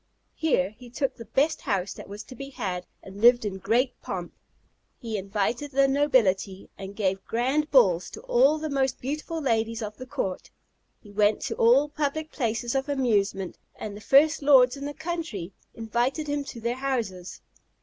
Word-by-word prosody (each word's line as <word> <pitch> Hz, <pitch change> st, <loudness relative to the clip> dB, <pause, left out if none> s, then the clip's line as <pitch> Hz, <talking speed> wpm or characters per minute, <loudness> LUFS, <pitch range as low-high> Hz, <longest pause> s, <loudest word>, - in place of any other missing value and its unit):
Here 205 Hz, -, +1 dB
he 240 Hz, +3 st, -14 dB
took 270 Hz, +3 st, -2 dB
the 230 Hz, -, -10 dB
best 275 Hz, +8 st, +1 dB
house 190 Hz, -1 st, -1 dB
that -, -, -11 dB
was 205 Hz, +2 st, -7 dB
to 255 Hz, -, -12 dB
be 275 Hz, +3 st, -7 dB
had, 190 Hz, -9 st, -4 dB, 0.2 s
and 195 Hz, +1 st, -10 dB
lived 240 Hz, 0 st, +6 dB
in 190 Hz, -2 st, -3 dB
great 245 Hz, +6 st, +1 dB
pomp. -, -, -5 dB, 0.7 s
He 225 Hz, -2 st, -5 dB
invited 210 Hz, +7 st, -2 dB
the 275 Hz, 0 st, +3 dB
nobility, 215 Hz, -9 st, +1 dB
and 195 Hz, 0 st, -8 dB
gave 195 Hz, -2 st, -1 dB
grand 265 Hz, +6 st, 0 dB
balls 190 Hz, -11 st, +4 dB
to 440 Hz, -, -10 dB
all -, -, +4 dB
the 310 Hz, 0 st, -4 dB
most 270 Hz, -3 st, 0 dB
beautiful 305 Hz, +5 st, -4 dB
ladies 230 Hz, -4 st, 0 dB
of 210 Hz, 0 st, -6 dB
the 255 Hz, -, -9 dB
court. 245 Hz, -9 st, -4 dB, 0.5 s
He 205 Hz, -, -14 dB
went 210 Hz, +1 st, +3 dB
to -, -, -3 dB
all 255 Hz, +6 st, +5 dB
public 300 Hz, +1 st, -3 dB
places 235 Hz, -2 st, -1 dB
of 270 Hz, +1 st, -1 dB
amusement, 205 Hz, -8 st, 0 dB, 0.2 s
and 210 Hz, -1 st, -6 dB
the 210 Hz, -, -10 dB
first 290 Hz, +8 st, +4 dB
lords 265 Hz, -3 st, +6 dB
in 280 Hz, 0 st, -6 dB
the 290 Hz, 0 st, -5 dB
country 315 Hz, -, -4 dB, 0.2 s
invited 240 Hz, +6 st, -1 dB
him 290 Hz, -1 st, -2 dB
to 240 Hz, -, -8 dB
their 235 Hz, +2 st, -2 dB
houses. 230 Hz, -10 st, -3 dB
245 Hz, 180 wpm, -26 LUFS, 205-280 Hz, 0.7 s, lived